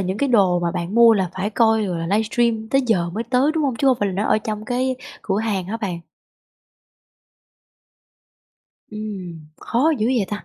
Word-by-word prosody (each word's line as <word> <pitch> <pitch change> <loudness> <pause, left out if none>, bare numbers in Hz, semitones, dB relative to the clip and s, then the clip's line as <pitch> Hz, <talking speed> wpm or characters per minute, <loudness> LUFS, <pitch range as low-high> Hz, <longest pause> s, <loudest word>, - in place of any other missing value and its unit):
những 190 +2 -2
cái 280 - +1
đồ 195 -7 +3
mà 170 - 0
bạn 175 +2 -4
mua 235 -1 +7
là 190 -4 -1
phải 190 +3 -2
coi 220 -1 +2
rồi 180 -3 -3
là 165 - -3
livestream 220 0 0
tới 270 +2 +3
giờ 175 -7 +1
mới 220 +6 -4
tới, 255 +5 +2
đúng 315 -2 0
hông? 265 -4 -1
Chứ 275 - 0
không 260 - +4
phải 205 - +1
là 190 - -4
nó 200 +3 -1
ở - - +3
trong 215 0 -5
cái 255 +3 -1 0.3
cửa 195 -1 -1
hàng 210 -4 -1
hả 220 - -3
bạn? 190 -7 -4 2.9
Ừm, 195 -6 -7 0.2
khó 265 +7 +1
dữ 215 - +1
vậy 245 -5 +1
ta! 210 - -5
215 Hz, 200 wpm, -21 LUFS, 190-235 Hz, 2.9 s, mua